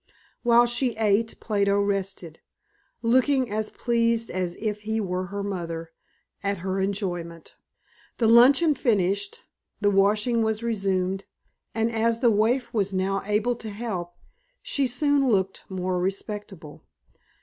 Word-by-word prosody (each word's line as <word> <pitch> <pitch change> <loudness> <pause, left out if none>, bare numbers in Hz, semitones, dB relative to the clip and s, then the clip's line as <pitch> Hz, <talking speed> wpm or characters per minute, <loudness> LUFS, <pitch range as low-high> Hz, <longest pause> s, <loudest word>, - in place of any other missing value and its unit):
While 240 0 +5
she 240 0 0
ate 220 +1 +1
Plato 200 -2 +1
rested, 195 -5 -2 0.6
looking 255 +1 +2
as 215 0 -2
pleased 230 -1 0
as 180 -2 -2
if 210 -1 -3
he 220 +1 -2
were 185 -2 -2
her 200 +1 -4
mother 170 -4 -5 0.5
at 200 0 -1
her 190 0 -1
enjoyment. 175 -4 -4 0.6
The 230 - +2
luncheon 270 +8 +6
finished, 235 - 0 0.4
the 205 -1 +2
washing 210 +4 +2
was 220 0 -1
resumed, 195 -4 -1 0.5
and 225 +1 +1
as 230 0 +1
the 240 -2 +4
waif 230 +4 +1
was 200 -3 0
now 195 +1 0
able 215 +4 +1
to 225 - -7
help, 200 -5 -5 0.5
she 275 -2 0
soon 275 +2 +2
looked 190 -3 0
more 185 -1 -2
respectable. 195 -4 -5
210 Hz, 130 wpm, -25 LUFS, 190-235 Hz, 0.6 s, luncheon